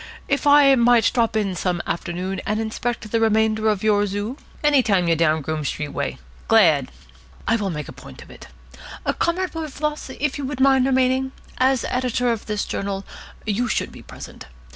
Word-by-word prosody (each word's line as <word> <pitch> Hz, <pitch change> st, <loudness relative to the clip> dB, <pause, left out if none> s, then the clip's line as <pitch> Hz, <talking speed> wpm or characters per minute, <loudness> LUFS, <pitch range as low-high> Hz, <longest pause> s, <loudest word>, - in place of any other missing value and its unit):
If 280 Hz, +1 st, 0 dB
I 285 Hz, -1 st, +7 dB
might 240 Hz, -2 st, +4 dB
drop 230 Hz, -2 st, +1 dB
in 205 Hz, -3 st, 0 dB
some 180 Hz, -1 st, -1 dB
afternoon 180 Hz, +3 st, -3 dB
and 210 Hz, +1 st, -1 dB
inspect 225 Hz, 0 st, -3 dB
the 230 Hz, -, +2 dB
remainder 220 Hz, 0 st, +2 dB
of 210 Hz, -2 st, -1 dB
your 205 Hz, -1 st, +3 dB
zoo 205 Hz, +5 st, -3 dB
?" -, -, -24 dB
"Any 295 Hz, -2 st, +5 dB
time 195 Hz, -7 st, +2 dB
you're 165 Hz, -, +3 dB
down 160 Hz, -1 st, +2 dB
Groome 155 Hz, +1 st, -3 dB
Street 145 Hz, +1 st, -3 dB
way. -, -, -3 dB, 0.3 s
Glad." 160 Hz, -12 st, +4 dB, 0.6 s
"I 225 Hz, -, +3 dB
will 205 Hz, -3 st, -1 dB
make 150 Hz, -4 st, -5 dB
a -, -, -8 dB
point -, -, -12 dB
of -, -, -16 dB
it. -, -, -13 dB, 0.7 s
Comrade 365 Hz, +2 st, 0 dB
Wilberfloss, 300 Hz, -1 st, -4 dB
would 285 Hz, +2 st, -2 dB
you 280 Hz, -, -3 dB
mind 265 Hz, -1 st, +4 dB
remaining? 260 Hz, 0 st, +1 dB, 0.3 s
As 260 Hz, -1 st, +2 dB
editor 250 Hz, -1 st, 0 dB
of 225 Hz, -2 st, -4 dB
this 210 Hz, -1 st, -2 dB
journal, 195 Hz, -1 st, -4 dB, 0.4 s
you 220 Hz, +3 st, 0 dB
should -, -, -1 dB
be -, -, -12 dB
present. -, -, -11 dB
225 Hz, 185 wpm, -22 LUFS, 195-260 Hz, 0.7 s, I